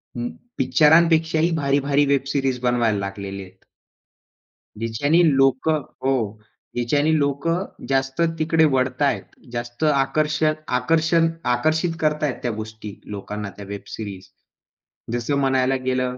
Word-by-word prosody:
उम्म, 120 Hz, 0 st, -3 dB, 0.3 s
पिक्चरांपेक्षाही 160 Hz, +4 st, +4 dB
भारी-भारी 140 Hz, 0 st, +2 dB
web 140 Hz, -1 st, +2 dB
series 135 Hz, -3 st, 0 dB
बनवायला 120 Hz, -4 st, +2 dB
लागलेले 100 Hz, 0 st, -5 dB
आहेत. 95 Hz, +1 st, -18 dB, 1.1 s
जिच्याने 130 Hz, +10 st, +1 dB
लोक 135 Hz, +2 st, +2 dB
हो, 140 Hz, -3 st, -1 dB, 0.6 s
ज्याच्याने 145 Hz, +6 st, +1 dB
लोक 140 Hz, +2 st, -1 dB, 0.4 s
जास्त 135 Hz, +3 st, 0 dB, 0.2 s
तिकडे 160 Hz, 0 st, +3 dB
वळतायेत. 130 Hz, +2 st, +1 dB, 0.3 s
जास्त 120 Hz, +4 st, -5 dB
आकर्षक 155 Hz, +2 st, +1 dB, 0.2 s
आकर्षण 165 Hz, +4 st, +2 dB, 0.2 s
आकर्षित 160 Hz, +6 st, +1 dB
करत 150 Hz, -1 st, 0 dB
आहेत 140 Hz, -4 st, 0 dB
त्या 120 Hz, -, 0 dB
गोष्टी 110 Hz, -1 st, -8 dB
लोकांना, 105 Hz, 0 st, -6 dB
त्या 100 Hz, 0 st, -11 dB
वेब 100 Hz, 0 st, -6 dB
सिरीज. 95 Hz, -3 st, -8 dB, 0.8 s
जसं 120 Hz, +4 st, -1 dB
म्हणायला 130 Hz, -1 st, +2 dB
गेलं, 125 Hz, -1 st, -1 dB
135 Hz, 115 wpm, -22 LUFS, 120-155 Hz, 1.1 s, पिक्चरांपेक्षाही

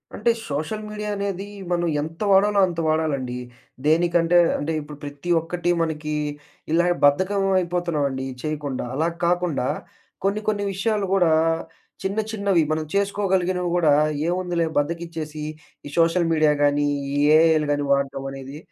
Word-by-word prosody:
అంటే, 220 Hz, +4 st, +1 dB, 0.2 s
social 155 Hz, +10 st, -3 dB
media 210 Hz, 0 st, -5 dB
అనేది 200 Hz, -1 st, -3 dB, 0.3 s
మనం 175 Hz, -1 st, +1 dB
ఎంత 160 Hz, +4 st, -7 dB
వాడాలో 200 Hz, +1 st, +4 dB
అంత 170 Hz, -2 st, -5 dB
వాడాలండి. 145 Hz, -6 st, 0 dB, 0.5 s
దేనికంటే 170 Hz, +2 st, +3 dB, 0.2 s
అంటే, 150 Hz, +3 st, -2 dB
ఇప్పుడు 150 Hz, 0 st, -10 dB
ప్రతి 145 Hz, +4 st, -7 dB
ఒక్కటి 175 Hz, +2 st, -2 dB
మనకి 155 Hz, -2 st, -2 dB, 0.6 s
ఇలా 170 Hz, +2 st, +3 dB, 0.2 s
బద్ధకం 185 Hz, +8 st, +3 dB
అయిపోతున్నామండి 170 Hz, -7 st, -1 dB, 0.2 s
చేయకుండా. 145 Hz, -5 st, -3 dB
అలా 155 Hz, +5 st, +1 dB, 0.2 s
కాకుండా, 175 Hz, -6 st, +1 dB, 0.6 s
కొన్ని, 200 Hz, +2 st, 0 dB
కొన్ని 205 Hz, -1 st, 0 dB
విషయాలు 205 Hz, 0 st, 0 dB
కూడా, 180 Hz, -4 st, +4 dB, 0.7 s
చిన్న, 195 Hz, +3 st, -1 dB
చిన్నవి 200 Hz, -5 st, +2 dB
మనం 155 Hz, 0 st, 0 dB
చేసుకోగలిగినవి 190 Hz, -3 st, 0 dB
కూడా 160 Hz, -4 st, +4 dB, 0.4 s
ఏముందిలే 175 Hz, -2 st, 0 dB
బద్ధకిచ్చేసి, 160 Hz, -1 st, -4 dB, 0.4 s
ఈ -, -, -7 dB
సోషల్ 165 Hz, +1 st, +3 dB
మీడియా 155 Hz, -1 st, +4 dB
గానీ, 145 Hz, 0 st, +3 dB, 0.3 s
ఈ -, -, 0 dB, 0.2 s
ఏఐలు 160 Hz, -2 st, +4 dB
గాని 145 Hz, 0 st, -1 dB
వాడటం 140 Hz, -1 st, -1 dB
అనేది 135 Hz, +1 st, -8 dB
165 Hz, 130 wpm, -23 LUFS, 150-185 Hz, 0.7 s, వాడాలో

